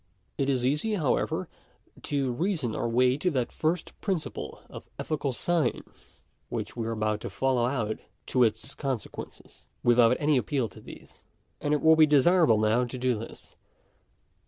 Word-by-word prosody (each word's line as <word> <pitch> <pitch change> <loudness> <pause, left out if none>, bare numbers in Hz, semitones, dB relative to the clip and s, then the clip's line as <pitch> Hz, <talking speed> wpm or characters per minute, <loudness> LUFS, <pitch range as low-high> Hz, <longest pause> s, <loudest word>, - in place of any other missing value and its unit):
It 140 -1 0
is 130 -2 +1
easy, 150 +12 +1
however,. 150 -9 0 0.5
to 140 -3 -1
reason 155 - -1
our 120 - -1
way 125 +2 +3
to 180 +5 +1
that 130 -7 -1
first 160 +2 -1
principle 190 -6 -4
of - - -11
ethical 145 -3 -2
science 160 +1 -3 0.3
which - - -4
we 115 -2 -3
are - - -2
about 110 -1 -1
to - - -5
follow 130 -3 +1
out 115 -5 -2 0.3
to 125 - 0
its 115 +4 +1
consequences, 135 -6 -6 0.2
without 120 0 +5
any 150 -1 +3
appeal 130 -1 0
to - - -14
these. - - -14 0.4
And 145 - -1
it 150 - +1
will 160 0 +7
be 155 -1 +6
desirable 150 -3 +5
now 110 +3 +2
to 125 +1 -5
do 125 -3 0
this. 115 - -11
130 Hz, 160 wpm, -28 LUFS, 120-150 Hz, 0.5 s, will